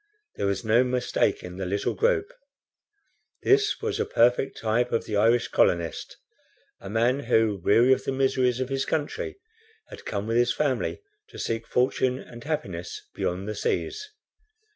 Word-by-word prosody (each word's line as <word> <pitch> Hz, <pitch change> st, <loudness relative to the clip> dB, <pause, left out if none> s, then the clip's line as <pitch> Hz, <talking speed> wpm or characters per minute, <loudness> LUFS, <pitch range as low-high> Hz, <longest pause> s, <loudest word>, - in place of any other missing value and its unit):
There 100 Hz, -, -1 dB
was 100 Hz, +2 st, -2 dB
no 115 Hz, +3 st, +4 dB
mistaking 125 Hz, -7 st, -1 dB
the 95 Hz, -, -3 dB
little 100 Hz, +2 st, -1 dB
group. 465 Hz, -1 st, +1 dB, 1.1 s
This 420 Hz, +1 st, +3 dB
was -, -, -1 dB
a -, -, +3 dB
perfect 125 Hz, +3 st, +2 dB
type 115 Hz, +2 st, 0 dB
of 115 Hz, -, 0 dB
the 105 Hz, -, -3 dB
Irish 115 Hz, +3 st, +3 dB
colonist 85 Hz, -2 st, 0 dB, 0.6 s
a 95 Hz, -, -9 dB
man 120 Hz, +5 st, +2 dB
who, 110 Hz, -4 st, +2 dB
weary 120 Hz, +7 st, +5 dB
of -, -, -2 dB
the -, -, -1 dB
miseries 130 Hz, -2 st, +1 dB
of 130 Hz, 0 st, -2 dB
his 135 Hz, 0 st, 0 dB
country, 155 Hz, -, -3 dB, 0.5 s
had -, -, -11 dB
come, 100 Hz, -1 st, -3 dB
with 115 Hz, +1 st, 0 dB
his 120 Hz, 0 st, +2 dB
family, 145 Hz, -, -1 dB, 0.3 s
to -, -, -12 dB
seek 115 Hz, 0 st, -3 dB
fortune 125 Hz, 0 st, +1 dB
and 120 Hz, -2 st, -11 dB
happiness 95 Hz, -, -4 dB
beyond 90 Hz, +3 st, -3 dB
the 105 Hz, -, -2 dB
seas. 425 Hz, -, -2 dB
120 Hz, 160 wpm, -26 LUFS, 105-135 Hz, 1.1 s, weary